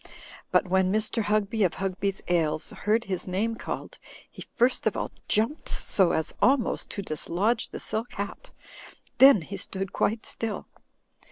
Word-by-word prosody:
But - - +3
when 190 0 +2
Mr. 215 +2 0
Hugby, 210 +1 0
of 180 - +1
Hugby's 195 0 -2
Ales, 155 -3 0
heard 220 +2 0
his 190 -5 -3
name 200 +5 0
called, 225 - -6 0.3
he - - -9
first 250 +1 +2
of - - 0
all - - -3 0.2
jumped 230 +9 +1
so 190 -4 +2
as 160 - -1
almost 265 -2 +2
to 200 - -4
dislodge 195 +8 -1
the - - -7
silk 220 +3 -3
hat, 205 - -6 0.7
then 265 -9 +8
he 195 +5 -6
stood 190 +1 -3
quite 220 +1 0
still. 225 -2 -3
205 Hz, 155 wpm, -27 LUFS, 185-225 Hz, 0.7 s, then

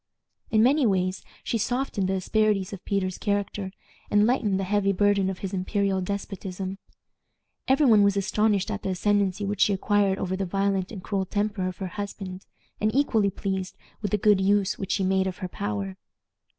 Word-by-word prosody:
In 220 0 +4
many 270 +1 +4
ways 185 -1 0 0.2
she 230 - -1
softened 245 -5 -1
the 190 - +1
asperities 205 0 +1
of 185 - -8
Peter's 185 -2 -1
character, 200 -1 -2 0.4
and 205 0 +4
lightened 215 -5 +1
the - - -1
heavy 200 +1 +1
burden 200 0 +2
of 190 - -4
his 190 - -5
imperial 195 0 0
despotism. 195 0 -5 0.9
Every 270 +3 +4
one 220 -5 +6
was 200 0 +3
astonished 205 +1 +1
at 210 - -3
the - - -3
ascendency 200 +1 +1
which 200 0 -2
she 205 - +5
acquired 200 0 +2
over 185 -1 -2
the 195 - -2
violent 195 0 0
and 195 -5 -8
cruel 195 -2 -1
temper 205 -1 -1
of 185 - -5
her 190 - -4 0.2
husband, 195 -2 -7 0.3
and 215 - +2
equally 225 -8 +3
pleased 190 -1 -4 0.2
with 205 - -1
the 210 - +1
good 205 -1 +4
use 200 0 +2
which 195 - -2
she 195 - 0
made 190 0 +2
of 185 - -4
her 185 - -4
power. 100 - -4
195 Hz, 185 wpm, -26 LUFS, 190-205 Hz, 0.9 s, one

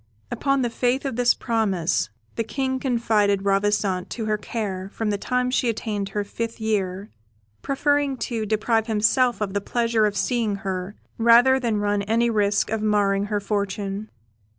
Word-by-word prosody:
Upon 275 -2 +1
the 240 - -1
faith 250 +4 0
of 270 -4 -2
this 245 0 +3
promise, 195 - 0 0.3
the 230 - -1
King 260 +2 -2
confided 220 -6 +1
Ravissante 195 -2 +1
to 225 - -4
her 215 0 0
care 195 -4 -4
from 220 -1 -2
the 205 - 0
time 250 +2 0
she 250 -1 +1
attained 210 -3 -3
her 205 +1 -2
fifth 230 +3 -5
year, 200 -2 -2 0.5
preferring 285 0 +1
to 225 -3 -3
deprive 220 +1 +1
himself 230 +3 +2
of 200 -2 -2
the 205 - 0
pleasure 230 0 +1
of 205 -1 -3
seeing 215 +1 0
her 190 +1 -3 0.2
rather 240 +3 +6
than 230 -4 0
run 205 0 0
any 230 +3 +1
risk 205 -1 +1
of 220 -1 -1
marring 205 -2 +2
her 210 0 -1
fortune. 200 0 -3
215 Hz, 165 wpm, -23 LUFS, 200-235 Hz, 0.5 s, rather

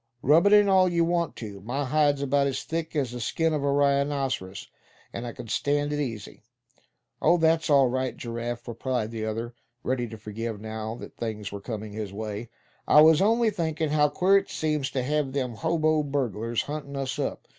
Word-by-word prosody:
Rub 160 +8 +5
it 205 - +5
in 205 -1 +7
all 190 -1 +5
you 170 -1 +2
want 170 -2 0
to; 100 -4 -8
my 135 +7 -2
hide's 145 0 +2
about 140 0 +2
as 135 - -3
thick 165 0 -4
as 135 -5 0
the 125 - -6
skin 160 +7 0
of 150 -2 -1
a 140 - +2
rhinoceros, 140 -8 0 0.5
and 120 +1 -5
I - - -4
c'n 120 0 -9
stand 145 +5 0
it 145 - -1
easy." 115 -7 -5 0.8
"Oh! 170 +3 +4
that's 160 -1 +2
all 140 -3 +5
right, 130 +1 -2
Giraffe," 120 +1 -5
replied 120 -1 -2
the 110 -1 -4
other, 115 +2 -4 0.3
ready 125 -1 -1
to 110 0 -9
forgive, 110 +1 -5
now 110 +1 -5
that - - -11
things 110 -3 -4
were 100 0 -7
coming 110 -1 -6
his 105 -2 -5
way; 105 +2 -5 0.4
"I 150 - +7
was 160 +1 +6
only 225 +2 +3
thinkin' 160 -5 -2
how 150 -1 +3
queer 185 +6 +4
it 195 - -11
seems 150 -3 -1
to 130 - -2
have 145 0 -1
them 130 -4 -2
hobo 155 +3 +1
burglars 120 -6 -2
huntin' 145 -1 -6
us 135 -1 -3
up. - - -3
135 Hz, 200 wpm, -26 LUFS, 115-155 Hz, 0.8 s, in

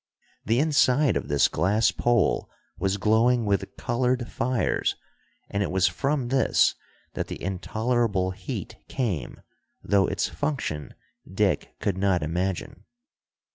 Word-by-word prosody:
The 115 +3 +1
inside 145 -3 +3
of - - -2
this 70 -1 +3
glass 105 +5 +2
pole 120 -5 +1 0.3
was 95 +1 0
glowing 115 +3 +3
with 100 -1 -1
colored 125 0 0
fires, 120 -4 0 0.5
and 100 - -2
it 100 - 0
was 95 0 +3
from 135 +7 -1
this 135 0 +3 0.4
that - - -3
the - - -6
intolerable 105 +1 0
heat 95 - -6
came, 105 - -3 0.4
though 100 -1 +3
its - - -1
function 130 - -3 0.4
Dick 95 -5 0
could 95 -2 -1
not 95 -4 +2
imagine. 90 +4 -3
105 Hz, 125 wpm, -26 LUFS, 95-125 Hz, 0.5 s, inside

